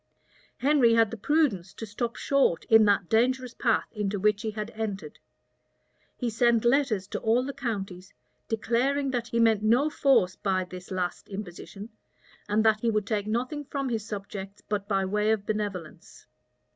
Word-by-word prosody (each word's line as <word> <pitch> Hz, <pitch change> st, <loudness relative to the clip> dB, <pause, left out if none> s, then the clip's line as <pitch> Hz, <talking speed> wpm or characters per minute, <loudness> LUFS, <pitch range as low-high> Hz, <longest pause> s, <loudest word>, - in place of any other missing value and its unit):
Henry 260 Hz, -4 st, +4 dB
had 225 Hz, -2 st, +3 dB
the -, -, -4 dB
prudence 225 Hz, -, 0 dB
to 225 Hz, -, -6 dB
stop 230 Hz, +3 st, -4 dB
short 275 Hz, -11 st, +1 dB
in 220 Hz, -1 st, +6 dB
that 200 Hz, -3 st, +2 dB
dangerous 250 Hz, +3 st, +1 dB
path 230 Hz, -3 st, +1 dB
into 205 Hz, -2 st, -2 dB
which 210 Hz, +1 st, +2 dB
he 220 Hz, -, -2 dB
had 215 Hz, +1 st, -5 dB
entered. 200 Hz, -9 st, -5 dB, 1.0 s
He 245 Hz, -, -2 dB
sent 235 Hz, 0 st, +2 dB
letters 240 Hz, -6 st, +2 dB
to -, -, -3 dB
all 230 Hz, +3 st, +2 dB
the 280 Hz, -, -4 dB
counties, 195 Hz, -7 st, -5 dB, 0.4 s
declaring 260 Hz, +5 st, 0 dB
that 240 Hz, -2 st, -2 dB
he 235 Hz, 0 st, -1 dB
meant 225 Hz, -2 st, +4 dB
no 245 Hz, +8 st, +3 dB
force 265 Hz, -11 st, +3 dB
by 190 Hz, -2 st, 0 dB
this 180 Hz, 0 st, -10 dB
last 180 Hz, -2 st, -3 dB
imposition, 200 Hz, +1 st, -8 dB, 0.6 s
and 210 Hz, +1 st, +2 dB
that 220 Hz, -1 st, +4 dB
he 235 Hz, -, 0 dB
would 215 Hz, -2 st, 0 dB
take 205 Hz, 0 st, -2 dB
nothing 250 Hz, +7 st, -2 dB
from 275 Hz, -1 st, -3 dB
his 225 Hz, -3 st, -2 dB
subjects 200 Hz, -2 st, -7 dB
but 205 Hz, -1 st, -2 dB
by 195 Hz, -2 st, +1 dB
way 210 Hz, +2 st, 0 dB
of 210 Hz, -2 st, -1 dB
"benevolence." 200 Hz, -7 st, -5 dB
215 Hz, 170 wpm, -27 LUFS, 200-240 Hz, 1.0 s, in